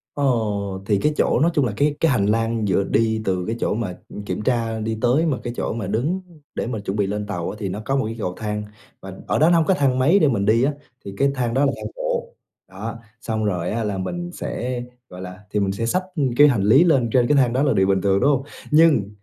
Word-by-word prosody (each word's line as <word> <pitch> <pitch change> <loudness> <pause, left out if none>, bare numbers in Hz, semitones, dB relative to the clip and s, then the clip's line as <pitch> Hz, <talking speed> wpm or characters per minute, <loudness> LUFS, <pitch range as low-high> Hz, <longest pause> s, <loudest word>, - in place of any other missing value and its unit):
Ồ, 105 -8 -1
thì 105 -2 +2
cái 150 +5 +1
chỗ - - +2
nói 170 +3 +3
chung 145 -4 +2
là - - -2
cái 145 0 +2
cái 165 -3 +3
hành 100 -5 +2
lang 115 0 0
giữa 95 +1 +2
đi 110 +1 +1
từ 90 -2 -1
cái 115 - -1
chỗ - - 0
mà, 105 -5 -3
ừm, 105 - -8
kiểm - - -3
tra 115 -2 -1
đi 110 0 -3
tới, 140 +7 +3
mà 145 -5 0
cái 120 -1 -4
chỗ - - -2
mà 110 -5 -4
đứng 145 - -1 0.3
để - - -2
mà 115 -4 -3
chuẩn 100 +1 -4
bị 100 -2 +1
lên 105 +1 -3
tàu 90 -5 -3
á, 100 - -6
thì 100 -3 -3
nó 105 +4 -5
có 135 - 0
một 135 - +1
cái 115 +1 -4
cầu 90 -3 -2
thang. 105 -1 -3 0.4
Và 95 -1 -8
ở - - +1
đó 160 +2 +5
nó 175 - +4
hông 160 - +2
có 190 - +3
thang 135 -6 +1
máy 165 +10 +4
để 155 - +4
mình 105 -6 0
đi 115 +4 +3
á, 145 +1 +1 0.3
thì 100 - -6
cái 140 0 +2
thang 120 -2 -1
đó 140 +2 +3
là 140 - +2
thang - - -6
bộ. - - -3 0.4
Đó, 110 +5 -6 0.2
xong 110 -1 -2
rồi 90 -4 -1
á, 115 +1 -1
là 100 -2 -2
mình 175 - -4
sẽ 125 0 -4 0.3
gọi 90 0 -9
là 90 +1 -8
thì 105 - 0
mình 95 -1 0
sẽ 115 +4 -3
xách 185 +10 0 0.3
cái 145 0 +8
hành 115 -8 +1
lý 135 - +6
lên 135 -9 +3
trên 125 -2 +3
cái 145 - +3
thang 125 -3 +3
đó 135 +3 +1
là 145 - +3
điều 95 0 +2
bình 95 -1 +2
thường, 100 -1 +2
đúng 140 - +3
hông? 135 -1 0 0.3
Nhưng 150 -10 +4
115 Hz, 275 wpm, -22 LUFS, 100-140 Hz, 0.4 s, cái